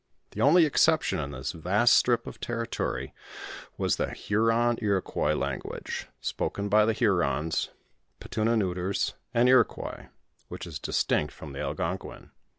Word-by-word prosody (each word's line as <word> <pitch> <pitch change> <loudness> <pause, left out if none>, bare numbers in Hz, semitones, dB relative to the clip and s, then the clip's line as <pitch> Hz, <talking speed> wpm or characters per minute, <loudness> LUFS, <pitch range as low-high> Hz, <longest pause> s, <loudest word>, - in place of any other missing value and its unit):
The - - -5
only 165 +4 +6
exception 155 +1 +2
in 70 - -3
this 65 -2 -4
vast 95 +8 +3
strip 120 -1 +3
of - - -9
territory, 115 -1 -3 0.6
was - - +1
the - - -1
Huron 115 +3 +1
Iroquois 100 -4 0
lan^uase, - - -4
spoken 100 0 -3
by 105 +1 +5
the 115 - +2
Hurons, 80 - +1 0.5
Petuns^ 115 +1 0
Neuters, 95 -1 -1 0.2
and 120 0 +3
Iroquois, 130 0 +2 0.4
which - - -7
is 75 -5 -7
distinct 75 - 0
from 75 -3 -10
the 70 - -7
Algonquin. 90 +3 -4
105 Hz, 135 wpm, -28 LUFS, 85-120 Hz, 0.6 s, only